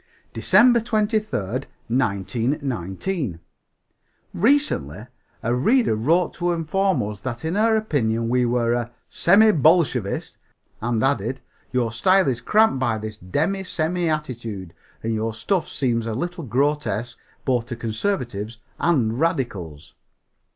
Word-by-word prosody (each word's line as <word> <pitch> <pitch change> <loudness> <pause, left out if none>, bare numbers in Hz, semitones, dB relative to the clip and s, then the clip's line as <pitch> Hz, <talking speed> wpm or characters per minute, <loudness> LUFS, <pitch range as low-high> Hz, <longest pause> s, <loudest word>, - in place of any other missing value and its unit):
DECEMBER 225 - +5
23, 215 -1 +1 0.7
1919. 120 - -2 0.9
Recently, 170 - +1 0.4
a 120 +1 +1
reader 220 - +3
wrote 165 +11 +2
to 175 0 -1
inform 170 - 0
us 105 -1 -5
that 125 +2 -5
in 160 - -1
her 220 +2 +3
opinion 115 - 0
we 125 +1 +2
were 120 -1 +1
a 120 -1 -1 0.2
"semi 215 +5 +5
Bolshevist," 150 - +2 0.4
and 115 -1 0
added, 135 -1 0 0.3
"your 120 -3 0
style 185 +9 +3
is 125 -2 0
cramped 215 - +3
by 120 -4 0
this 110 0 -6
demi 160 - -1
semi 175 -1 -1
attitude, 115 - -4 0.3
and 115 0 -1
your 110 0 -2
stuff 175 - -1
seems 115 -4 -1
a 110 - -2
little 175 - -4
grotesque 125 -2 -1 0.3
both 125 -3 0
to 120 - -5
conservatives 115 - -3 0.2
and 125 -9 +1
radicals." 115 - -2
130 Hz, 125 wpm, -23 LUFS, 115-175 Hz, 0.9 s, DECEMBER